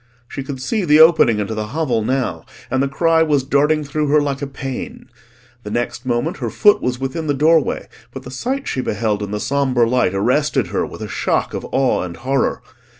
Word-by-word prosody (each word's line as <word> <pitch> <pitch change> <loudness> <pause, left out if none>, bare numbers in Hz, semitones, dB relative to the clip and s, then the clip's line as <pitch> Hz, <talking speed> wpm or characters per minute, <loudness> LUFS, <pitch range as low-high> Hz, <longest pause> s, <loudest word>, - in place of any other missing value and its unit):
She 135 - -6
could 135 0 -6
see 200 - -1
the 150 -3 +4
opening 160 -9 +6
into 105 +1 -2
the 110 -1 -3
hovel 130 -9 +1
now, 115 -9 -2 0.3
and 130 +1 +1
the 140 - +1
cry 165 +4 +2
was 150 -4 +2
darting 150 +3 +2
through 150 +1 -2
her 150 +2 +4
like 140 -1 -2
a 140 - -3
pain. 135 -2 -7 0.5
The 105 - -8
next 120 +3 -3
moment 120 +8 -1
her - - -3
foot 205 -1 +4
was 125 0 -1
within 135 +4 -3
the 145 - +1
doorway, 155 +1 +2 0.2
but - - -8
the 125 - -9
sight 260 - -3
she 130 - -1
beheld 105 -2 -1
in 100 - -4
the 105 +1 -3
sombre 130 -2 +1
light 120 -6 +1
arrested 125 +9 +1
her - - -1
with - - -10
a - - -5
shock - - -1
of - - -5
awe 135 -1 +1
and 90 -2 -6
horror. 135 +2 -1
135 Hz, 210 wpm, -19 LUFS, 120-150 Hz, 0.5 s, opening